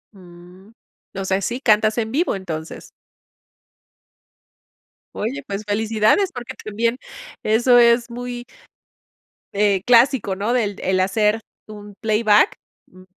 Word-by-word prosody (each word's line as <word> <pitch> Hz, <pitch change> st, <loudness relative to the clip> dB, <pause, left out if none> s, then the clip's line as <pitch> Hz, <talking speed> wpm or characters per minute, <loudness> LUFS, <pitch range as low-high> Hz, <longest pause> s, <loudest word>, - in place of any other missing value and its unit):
Uh, 180 Hz, +2 st, -16 dB, 0.4 s
o 195 Hz, -, -4 dB
sea, 190 Hz, +1 st, 0 dB
si 235 Hz, +6 st, -3 dB
cantas 215 Hz, -2 st, +3 dB
en 220 Hz, -1 st, -2 dB
vivo, 305 Hz, -, 0 dB
entonces. 165 Hz, -4 st, -7 dB, 2.3 s
Oye, 265 Hz, +6 st, -4 dB
pues 200 Hz, +1 st, -4 dB
felicidades, 220 Hz, -, +1 dB
porque 245 Hz, -4 st, -8 dB
también 230 Hz, +3 st, -1 dB, 0.5 s
eso 240 Hz, +3 st, +4 dB
es 235 Hz, 0 st, +4 dB
muy, 245 Hz, 0 st, -7 dB, 1.1 s
eh, 200 Hz, -2 st, +2 dB
clásico, 240 Hz, -4 st, +3 dB
¿no? 210 Hz, +5 st, -2 dB
el 210 Hz, -5 st, 0 dB
el 185 Hz, 0 st, 0 dB
hacer 210 Hz, +3 st, +1 dB, 0.3 s
un 205 Hz, -1 st, -11 dB
playback. 215 Hz, -, +3 dB, 0.3 s
M 185 Hz, 0 st, -17 dB
215 Hz, 115 wpm, -20 LUFS, 195-240 Hz, 2.3 s, eso